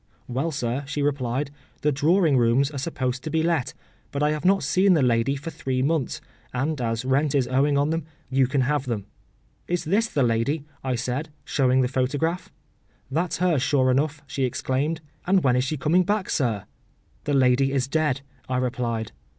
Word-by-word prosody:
“Well, 130 +6 -1
sir,” 130 -2 -2
she 145 0 -2
replied, 140 -1 -1 0.3
“the 150 - +2
drawing 155 +2 +3
rooms 125 +3 +3
are 140 - -5
supposed 130 -3 -2
to 155 - -4
be 160 0 +1
let; 165 -6 0 0.3
but 140 +1 -2
I 150 - +3
have 155 0 -3
not 195 -1 +3
seen 185 +6 +4
the 150 - +3
lady 120 +2 +2
for 140 +4 -6
three 130 -3 -2
months, 150 -2 0 0.3
and 140 +3 -1
as 115 +1 -1
rent 140 +2 +2
is 130 -3 +2
owing 140 +3 +2
on 145 +2 +2
them, 165 -2 -2 0.2
you 135 -1 +2
can 135 +1 +1
have 140 +1 0
them.”—“Is 120 - -6
this 200 +8 +2
the 145 -10 0
lady?” 125 +6 0 0.2
I 130 -1 0
said, 125 +6 -3 0.2
showing 130 -2 +2
the 125 - +2
photograph. 145 +7 -1 0.6
“That’s 165 +5 0
her, 175 -4 +2
sure 130 0 +2
enough,” 145 +3 0
she 140 -1 -3
exclaimed; 135 +5 -1 0.3
“and 190 0 +4
when 125 -2 +3
is 125 +1 +2
she 155 +3 -2
coming 160 +6 +3
back, 205 +1 -1
sir?”—“The 120 +3 -4
lady 135 +1 +4
is 135 -2 0
dead,” 150 -2 0 0.3
I 130 - 0
replied. 120 -3 -2
140 Hz, 185 wpm, -25 LUFS, 125-155 Hz, 0.6 s, seen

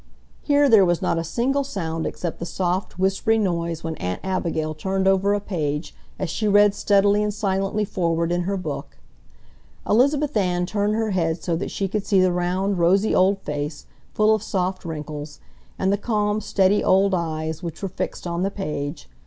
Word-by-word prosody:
Here 290 -1 +3
there 220 -6 +7
was 175 -2 +2
not 165 - 0
a - - -2
single 250 - 0
sound 165 -10 -3
except 170 -2 -5
the 170 - -4
soft, 180 +1 -2
whispery 195 +4 +2
noise 170 -5 -1
when 160 -1 -4
Aunt 90 0 -3
Abigail 165 -4 -1
turned 190 +4 -1
over 195 +1 +3
a - - 0
page 155 -6 -3 0.2
as 185 - -2
she 215 +6 -2
read 205 0 +5
steadily 205 0 +3
and 210 0 0
silently 200 0 -1
forward 170 -3 -1
in 175 0 +1
her 200 - 0
book. 145 -6 -6 0.9
Elizabeth 280 +6 +2
Ann 180 -3 +1
turned 205 +2 0
her 220 -1 0
head 165 -3 -1
so 170 - 0
that 170 - -3
she 195 - -2
could 205 +1 -2
see 195 - +4
the 185 -1 +4
round, 180 +2 0
rosy 195 +5 +3
old 195 +1 +3
face, 150 0 -4 0.3
full 215 +1 +4
of 215 - 0
soft 185 -3 -2
wrinkles, 150 -2 -6 0.4
and 190 +1 +1
the - - +1
calm, 210 -1 0
steady 195 0 +2
old 195 +1 +3
eyes 160 -2 -2
which 170 +2 -7
were - - 0
fixed 185 - -5
on 170 0 -2
the 195 - +1
page. 150 - -5
190 Hz, 185 wpm, -23 LUFS, 165-205 Hz, 0.9 s, there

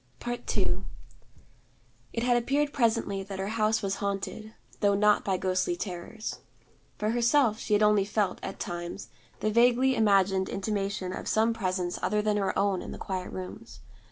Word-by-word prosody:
II 240 0 -1 1.3
It 230 - -2
had 245 0 +3
appeared 280 +4 +1
presently 225 -5 +1
that 195 0 -7
her 190 +1 -2
house 220 0 +1
was 195 0 -1
haunted, 200 +2 -3 0.3
though 200 -1 +3
not 210 +1 +4
by 190 -2 0
ghostly 185 - 0
terrors. 210 - -5 0.6
For 215 +1 0
herself, 235 -1 +3
she 215 - -2
had 210 +1 +4
only 210 -2 +4
felt, 205 -1 0
at - - -6
times, 175 +2 -5 0.3
the 215 - +1
vaguely 245 +3 +4
imagined 195 -3 +3
intimation 195 -2 -2
of - - -6
some 225 +1 +3
presence 185 -4 -2
other 210 +1 +1
than 210 -1 +1
her 195 -2 0
own 195 -1 +1
in - - -7
the - - -7
quiet 185 -2 -4
rooms. 190 +5 -8
210 Hz, 160 wpm, -28 LUFS, 195-230 Hz, 1.3 s, not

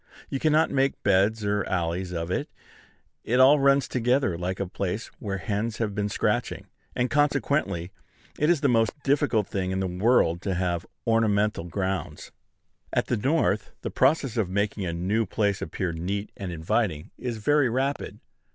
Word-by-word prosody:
You 135 - -1
cannot 155 +1 +3
make 135 0 0
beds 105 +3 +2
or 105 0 +1
alleys 90 0 -2
of 85 0 -3
it: - - -2 0.7
it 125 +3 +1
all 140 +3 +7
runs 140 0 +4
together 125 -5 +1
like 90 +2 -3
a 100 - -1
place 95 +3 -4
where 100 -2 -3
hens 105 +6 -2
have 110 -3 -1
been 105 0 -1
scratching; - - -1 0.3
and 125 - +1
consequently 140 - +1 0.5
it 150 - +3
is 170 -5 +3
the 145 - +3
most 115 -3 +2
difficult 140 -6 +2
thing 95 -2 -2
in 95 0 -1
the 95 - 0
world 90 -2 +2
to 95 -2 -2
have 90 -2 -1 0.2
ornamental 105 -5 +2
grounds. 95 +2 -3 0.6
At - - +1
the - - 0
North, 110 -5 0
the - - -4
process 135 -6 +2
of 105 -5 +1
making 100 0 -1
a - - -1
new 100 +6 0
place 100 -1 0
appear 90 -3 -3
neat 95 +5 -3
and 95 -3 -5
inviting 80 0 -1
is 120 -3 -3
very 145 +4 +3
rapid. 135 +4 -2
105 Hz, 170 wpm, -26 LUFS, 95-125 Hz, 0.7 s, all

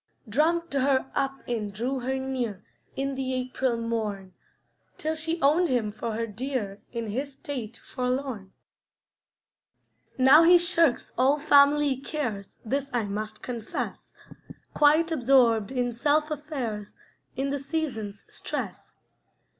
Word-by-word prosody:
Drummed 320 +8 +1
her 265 -1 +1
up 270 0 -2
and 220 -4 -2
drew 245 +6 -2
her 260 +2 -2
near, 250 -7 -3 0.3
In 275 +1 -2
the 260 -1 -2
April 255 -1 -1
morn, 215 -5 -3 0.6
Till 315 +1 -1
she 325 +1 -1
owned 320 +5 +4
him 235 -5 0
for 220 +2 -4
her 230 +1 -1
dear 220 -2 -4
In 230 -2 -4
his 270 +6 -3
state 265 -7 -6
forlorn. 250 -6 -3 1.7
Now 265 +4 +8
he 350 +2 +8
shirks 335 -5 +2
all 270 +3 +4
family 285 -1 +5
cares, 245 -8 -4
This 275 +4 -1
I 240 -2 0
must 210 +1 -5
confess; 235 -3 -5 0.6
Quite 310 +3 +4
absorbed 245 -7 +3
in 245 -2 0
self 300 +5 +1
affairs 265 -9 -4 0.4
In 275 +1 -1
the 285 - -1
season's 270 -9 -4
stress. - - -6
260 Hz, 125 wpm, -27 LUFS, 230-285 Hz, 1.7 s, Now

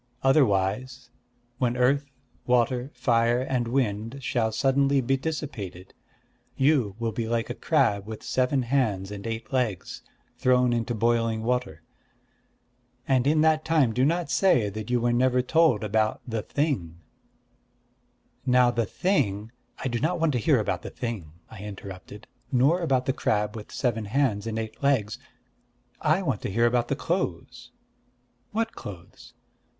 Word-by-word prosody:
Otherwise, 125 -1 +1 0.5
when 125 -1 0
Earth, 140 +3 +2 0.4
Water, 125 +1 +2
Fire, 120 0 +2
and 125 -2 -1
Wind 115 -1 -1
shall 115 -3 0
suddenly 135 +3 +2
be 135 +1 +1
dissipated, 130 - -5 0.6
you 130 -8 +2
will 115 -1 -2
be 110 +1 -3
like 115 0 -1
a - - -2
crab 100 0 +1
with 110 -1 -7
seven 130 +1 +1
hands 110 -7 0
and 100 +1 -6
eight 115 +3 -5
legs, 120 -8 -2 0.4
thrown 125 -1 +3
into 120 0 -1
boiling 115 0 +1
water. 115 -10 -2 1.2
And 130 -1 +2
in 155 +1 +3
that 155 0 +3
time 155 -8 +2
do 125 - +1
not 165 +1 +1
say 130 - +3
that 110 +2 -7
you 125 0 +2
were 120 0 +1
never 125 +1 +2
told 160 -6 +3
about 110 +1 +1
the 115 -2 -2
Thing.'... 110 - -2 1.5
Now 125 -1 +4
the 120 -3 -1
Thing 110 - 0
" - - -43
"I - - -3
do 120 -2 -1
not 170 +5 0
want 165 -1 +2
to 125 - +1
hear 105 - +3
about - - -1
the - - -7
Thing," 110 -10 -5 0.2
I 105 - -11
interrupted, 100 0 -9 0.3
"nor 140 +8 +3
about 130 -6 +1
the 135 - +1
crab 105 -4 0
with 105 -2 -9
seven 115 -4 -1
hands 110 -2 0
and 110 -1 -3
eight 110 -1 -5
legs. 125 -7 +1 0.8
I 195 - +2
want 130 - -1
to - - -3
hear 115 +4 +2
about 120 0 +2
the - - -1
clothes." - - -3 0.8
"What 225 +1 -1
clothes?" 105 +7 -11
120 Hz, 155 wpm, -26 LUFS, 110-135 Hz, 1.5 s, Now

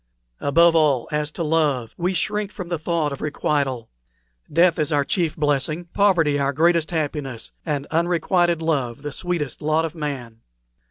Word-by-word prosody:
Above 165 +4 +4
all, 145 -6 +3
as 150 0 -1
to 165 - -4
love, 150 -7 +1
we 180 +2 0
shrink 200 +3 -1
from 180 -4 -7
the 170 -3 -2
thought 155 -2 -1
of 140 - -8
requital. 140 -5 -1 0.6
Death 170 +2 +4
is 155 +1 0
our 145 -2 +2
chief 170 -1 0
blessing, 150 +3 0
poverty 170 -8 +3
our 140 0 +1
greatest 165 +2 +2
happiness, 145 -7 -3 0.2
and 145 -2 -1
unrequited 170 0 +1
love 140 -5 -1
the 145 - -4
sweetest 170 -3 -3
lot 155 +2 +1
of 160 - -5
man." 135 -8 -5
155 Hz, 160 wpm, -22 LUFS, 145-170 Hz, 0.6 s, Above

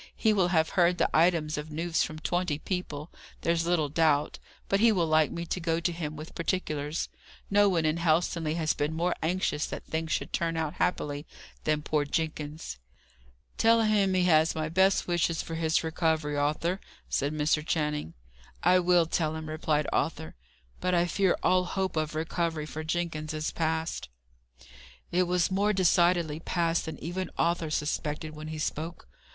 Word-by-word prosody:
"He 220 -2 +3
will 190 -4 +3
have 160 -3 +2
heard 175 -1 +3
the - - +1
items 160 -2 +3
of 150 +1 -7
news 165 +2 -1
from 155 - -2
twenty 175 -1 -1
people, 155 -3 -4 0.3
there's 170 0 +1
little 170 -4 +2
doubt; 150 -1 +1 0.3
but 195 - +2
he 230 +1 +6
will 180 -5 +2
like 155 -1 +3
me 170 0 -5
to 180 - -3
go 165 -1 0
to 170 +1 0
him 155 -3 -4
with 155 +2 -9
particulars. 155 -3 -2 0.4
No 205 0 +5
one 170 -4 +1
in 155 +1 +1
Helstonleigh 165 -1 +1
has 160 -2 +1
been 150 +2 -2
more 175 +2 +1
anxious 160 -3 0
that - - -7
things 160 0 -3
should - - -2
turn 165 -1 0
out 160 -1 -1
happily, 145 -3 -1 0.4
than 155 -1 +1
poor 150 0 +1
Jenkins." 150 - -3 0.8
"Tell 230 0 +5
him 205 -3 +2
he 185 - +3
has 160 -2 +4
my 155 -1 -2
best 190 +3 +3
wishes 175 -1 +1
for 165 - -7
his 160 0 +1
recovery, 160 -2 0
Arthur," 155 +6 0 0.3
said 140 +1 0
Mr. 150 0 +1
Channing. 150 - -2 0.5
"I 180 +1 +5
will 175 -1 +4
tell 160 -1 -1
him," 160 0 -6
replied 155 -1 0
Arthur. - - -1 0.5
"But 180 0 +1
I 170 0 +3
fear 190 +1 +2
all 185 0 +3
hope 190 0 -2
of 155 0 -1
recovery 160 -1 -1
for 155 +1 -6
Jenkins 155 -1 -2
is 155 0 -2
past." 160 - -2 1.0
It 180 +1 +2
was 180 +1 +1
more 205 +2 +2
decidedly 175 -4 +3
past 165 0 0
than 160 - -6
even 180 +3 -3
Arthur 170 -1 +1
suspected 150 0 -2
when 155 0 -7
he 155 0 -5
spoke. 160 +2 -4
165 Hz, 175 wpm, -28 LUFS, 155-175 Hz, 1.0 s, he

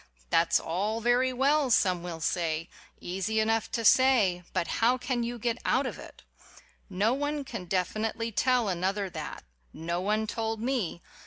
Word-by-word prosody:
"That's - - +4
all 205 +7 -2
very 245 +3 +2
well," 275 +2 +2
some 185 -6 +3
will 170 -2 -6
say; 165 -1 -1 0.3
"easy 195 +5 -2
enough 225 0 +1
to 230 - -1
say, 220 -9 +5
but 185 +2 -2
how 245 +3 +4
can 250 -1 -2
you 240 +1 -3
get 235 +1 -2
out 270 +2 +2
of - - -5
it?" - - -13 0.7
No 205 +5 +1
one 290 +1 -2
can 230 -8 -7
definitely 215 +5 -1
tell 245 +1 +2
another 190 +1 -1
that. 155 -3 -6 0.3
No 170 +2 -3
one 215 +3 0
told 225 0 -3
me. 230 -8 -2
220 Hz, 160 wpm, -28 LUFS, 185-245 Hz, 0.7 s, say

